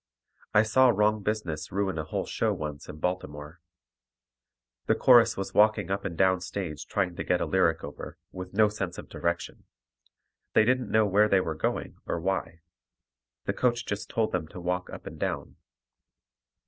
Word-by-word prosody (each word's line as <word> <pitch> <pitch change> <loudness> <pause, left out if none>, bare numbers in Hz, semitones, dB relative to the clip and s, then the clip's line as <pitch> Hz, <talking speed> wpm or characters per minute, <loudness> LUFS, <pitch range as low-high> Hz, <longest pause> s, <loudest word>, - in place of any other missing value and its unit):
I 105 - +7
saw 130 +4 +5
wrong 105 -1 +2
business 90 -8 -3
ruin 95 -3 -1
a - - -1
whole 75 - -3
show - - 0
once 75 -2 -6
in - - -8
Baltimore. 75 -2 -4 1.3
The - - +4
chorus 120 -3 +6
was 95 - -4
walking 105 -1 +3
up 100 - -2
and 85 - -4
down 95 -1 +3
stage 90 -5 -5
trying 90 -3 -1
to - - -4
get 90 - +1
a - - 0
lyric 85 -4 +2
over, 75 - -8
with 90 0 -7
no 105 +2 +4
sense 95 -4 -4
of - - -9
direction. 85 0 -3 0.9
They 110 - +5
didn't 125 -2 +1
know 110 0 +4
where 105 +2 +4
they 100 - +5
were 80 -3 -2
going 80 - -3
or 85 - -1
why. 90 -2 -2 0.8
The - - 0
coach 120 -1 0
just 100 0 -4
told 110 -1 0
them 85 -3 -2
to 90 - -10
walk 90 +1 -2
up - - -9
and - - -8
down. - - -3
95 Hz, 175 wpm, -28 LUFS, 85-105 Hz, 1.3 s, I